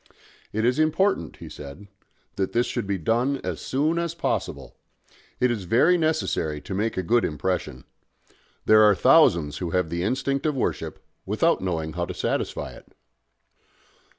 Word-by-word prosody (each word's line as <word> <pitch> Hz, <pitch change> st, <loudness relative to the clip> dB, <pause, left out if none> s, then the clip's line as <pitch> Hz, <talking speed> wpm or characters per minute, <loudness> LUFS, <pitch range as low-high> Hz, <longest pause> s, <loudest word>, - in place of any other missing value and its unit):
"It 110 Hz, +2 st, -1 dB
is 125 Hz, +4 st, +2 dB
important," 155 Hz, -, +1 dB
he -, -, -10 dB
said, 75 Hz, +8 st, -10 dB, 0.5 s
"that 95 Hz, -1 st, -2 dB
this 120 Hz, +1 st, +2 dB
should -, -, -3 dB
be 100 Hz, -1 st, 0 dB
done 120 Hz, -, +1 dB
as -, -, -4 dB
soon 155 Hz, +5 st, 0 dB
as 170 Hz, -1 st, -3 dB
possible. 170 Hz, -, -3 dB, 0.6 s
It 125 Hz, -1 st, +3 dB
is 105 Hz, -6 st, -3 dB
very 130 Hz, -, +4 dB
necessary 155 Hz, -, 0 dB
to -, -, -7 dB
make 105 Hz, +3 st, -1 dB
a 95 Hz, -, 0 dB
good 120 Hz, +6 st, +2 dB
impression. 75 Hz, -5 st, -2 dB, 0.8 s
There 110 Hz, 0 st, +6 dB
are 105 Hz, -1 st, +6 dB
thousands 75 Hz, -5 st, +4 dB
who 90 Hz, -, -3 dB
have 90 Hz, -2 st, 0 dB
the 85 Hz, 0 st, -2 dB
instinct 135 Hz, -, -1 dB
of 150 Hz, -, 0 dB
worship, 130 Hz, -, -3 dB, 0.2 s
without -, -, +1 dB
knowing 80 Hz, -4 st, -2 dB
how 85 Hz, +1 st, -2 dB
to -, -, -7 dB
satisfy -, -, -2 dB
it." -, -, -16 dB
105 Hz, 160 wpm, -25 LUFS, 85-135 Hz, 0.8 s, There